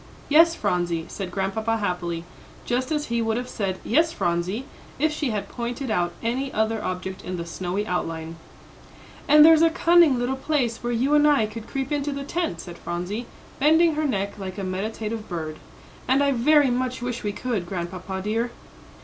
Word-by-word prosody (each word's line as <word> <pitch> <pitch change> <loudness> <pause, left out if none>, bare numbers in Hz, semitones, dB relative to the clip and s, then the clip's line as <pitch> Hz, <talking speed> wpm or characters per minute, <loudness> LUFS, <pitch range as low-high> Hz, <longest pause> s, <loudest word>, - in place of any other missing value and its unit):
"Yes, 330 +3 +6
Phronsie," 175 - -1
said 195 -3 -5
Grandpapa, 215 +4 -1
happily, 175 -5 -2 0.4
just 255 +4 -1
as 300 -1 0
he 235 0 -1
would 225 0 0
have 250 +1 -3
said 195 -6 -2
"Yes, 320 +7 +3
Phronsie," 185 - -1 0.3
if 305 +2 +1
she 300 -3 -1
had 210 -3 -2
pointed 240 +1 -4
out 175 -4 +1
any 260 +4 -1
other 220 0 0
object 185 +1 -4
in 180 0 -4
the 170 - -4
snowy 185 +4 -3
outline. 165 -3 -3 0.9
"And 300 0 +8
there's 320 -1 +7
a 330 - +6
cunning 335 -4 +5
little 245 +2 0
place 265 -5 -1
where 240 - -1
you 255 +5 +1
and 295 0 +6
I 285 -7 +4
could 220 +1 -8
creep 270 +1 -3
into 290 0 0
the 280 0 -4
tent," 280 - -2
said 175 -2 -10
Phronsie, 180 +7 -4 0.3
bending 320 +3 +5
her 305 +1 -1
neck 200 -6 -2
like 190 -1 -6
a 200 - -4
meditative 215 +3 -4
bird. 160 -3 -4 0.5
"And 270 +2 +4
I 280 - +3
very 275 +2 +4
much 250 0 -2
wish 245 -1 -3
we 205 - -2
could, 210 -5 -3
Grandpapa 185 +1 -4
dear." 225 +3 0
225 Hz, 185 wpm, -24 LUFS, 185-275 Hz, 0.9 s, And